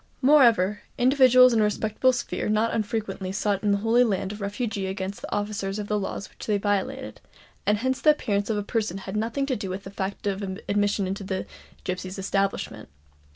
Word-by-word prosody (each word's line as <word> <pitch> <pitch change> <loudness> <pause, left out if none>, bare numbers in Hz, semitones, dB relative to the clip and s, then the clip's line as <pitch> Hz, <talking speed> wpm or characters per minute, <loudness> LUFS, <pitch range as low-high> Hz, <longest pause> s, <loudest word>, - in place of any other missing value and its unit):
Moreover, 235 -8 +5 0.2
individuals 255 -1 +6
in 225 - +3
a - - +4
respectable 215 +4 +2
sphere 245 - -3
not 215 +2 +2
unfrequently 205 -3 -2
sought 200 -1 0
in 210 - 0
the 200 - +3
Holy 225 +4 +3
Land 195 -4 -1
a - - -6
refuge 210 +3 -3
against 190 0 -4
the - - -7
officers 205 -1 -2
of 210 -1 -4
the 210 0 +1
laws 195 0 -4
which - - -12
they 210 -2 +2
violated; 205 +7 -2 0.5
and 210 - +4
hence 260 +4 -1
the 310 - +5
appearance 205 -9 +1
of 220 - 0
a 205 - -1
person 210 -4 -2
had 190 +1 -7
nothing 230 +6 -1
to 270 -2 -1
do 200 -3 -5
with 190 +2 -5
the 195 - -9
fact 200 0 -4
of 200 0 -1 0.3
admission 205 -1 +1
into 195 +2 -4
the 190 -1 -3 0.4
gipsies' 185 +1 -4
establishment. 195 - -2
205 Hz, 200 wpm, -25 LUFS, 195-230 Hz, 0.5 s, individuals